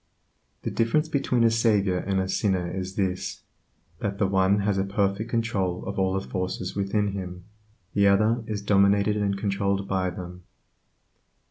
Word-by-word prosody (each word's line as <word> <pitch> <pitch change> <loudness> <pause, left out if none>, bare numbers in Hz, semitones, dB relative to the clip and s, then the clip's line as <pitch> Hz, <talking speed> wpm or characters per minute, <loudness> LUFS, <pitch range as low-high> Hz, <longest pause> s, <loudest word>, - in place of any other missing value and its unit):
The - - -2
difference 135 +8 +1
between 135 -5 +1
a 115 - +5
savior 105 -5 +2
and 95 0 -1
a 95 - -1
sinner 95 -2 0
is 95 +1 -5
this, 95 -2 -2 0.6
that 100 -1 -3
the 100 - +2
one 95 +1 +3
has 100 -1 +1
a - - +2
perfect 100 +2 -1
control 105 -6 -1
of 100 0 -4
all 95 0 +1
the - - -9
forces 90 0 -3
within 100 +1 0
him; 90 -2 -6 0.5
the 100 0 +4
other 110 +4 +3
is 105 -2 -3
dominated 100 +1 +3
and 100 -1 0
controlled 100 -1 -1
by 95 -1 0
them. 90 0 -8
100 Hz, 160 wpm, -26 LUFS, 95-105 Hz, 0.6 s, a